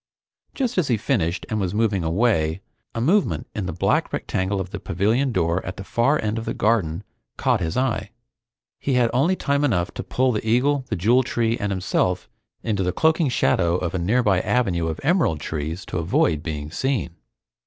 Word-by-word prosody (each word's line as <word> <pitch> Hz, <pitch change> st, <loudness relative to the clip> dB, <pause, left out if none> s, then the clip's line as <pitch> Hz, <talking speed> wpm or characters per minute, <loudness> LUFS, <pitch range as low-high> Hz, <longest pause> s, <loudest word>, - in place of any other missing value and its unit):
Just 250 Hz, -7 st, 0 dB
as 165 Hz, -, +1 dB
he 120 Hz, -, +2 dB
finished 100 Hz, -, -1 dB
and 110 Hz, -3 st, -2 dB
was 95 Hz, 0 st, -2 dB
moving 105 Hz, -5 st, +1 dB
away, 80 Hz, -2 st, +1 dB, 0.3 s
a -, -, -1 dB
movement 180 Hz, -, +2 dB
in 100 Hz, -3 st, -3 dB
the -, -, -2 dB
black 85 Hz, -, +1 dB
rectangle 95 Hz, +1 st, -1 dB
of 95 Hz, -1 st, -5 dB
the 100 Hz, -, -5 dB
pavilion 110 Hz, +11 st, 0 dB
door 85 Hz, -3 st, 0 dB
at 90 Hz, -, -6 dB
the 95 Hz, -, -6 dB
far 120 Hz, +9 st, +1 dB
end 110 Hz, +1 st, -1 dB
of 115 Hz, -, -6 dB
the -, -, -3 dB
garden 100 Hz, -6 st, +1 dB, 0.3 s
caught -, -, +2 dB
his 80 Hz, -1 st, -2 dB
eye. 120 Hz, -6 st, 0 dB, 0.7 s
He 140 Hz, -, -1 dB
had 120 Hz, -2 st, +3 dB
only 150 Hz, +10 st, +3 dB
time 140 Hz, -4 st, 0 dB
enough 90 Hz, -11 st, +1 dB
to -, -, -5 dB
pull 130 Hz, 0 st, +1 dB
the 105 Hz, -, -2 dB
eagle, 130 Hz, +5 st, +2 dB
the -, -, 0 dB
Jewel 115 Hz, +8 st, +3 dB
Tree, 115 Hz, -2 st, 0 dB
and 105 Hz, -3 st, -3 dB
himself 90 Hz, -1 st, 0 dB, 0.4 s
into 105 Hz, -4 st, -1 dB
the 90 Hz, -1 st, +1 dB
cloaking 160 Hz, -, +2 dB
shadow 85 Hz, -7 st, +2 dB
of 90 Hz, -2 st, -2 dB
a 95 Hz, -, -1 dB
nearby 100 Hz, +1 st, +2 dB
avenue 90 Hz, -10 st, 0 dB
of 80 Hz, -1 st, -3 dB
emerald 160 Hz, -, +2 dB
trees 80 Hz, +4 st, -4 dB
to -, -, -3 dB
avoid 80 Hz, -2 st, +1 dB
being 75 Hz, -2 st, -5 dB
seen. 130 Hz, +3 st, -1 dB
105 Hz, 195 wpm, -23 LUFS, 85-125 Hz, 0.7 s, had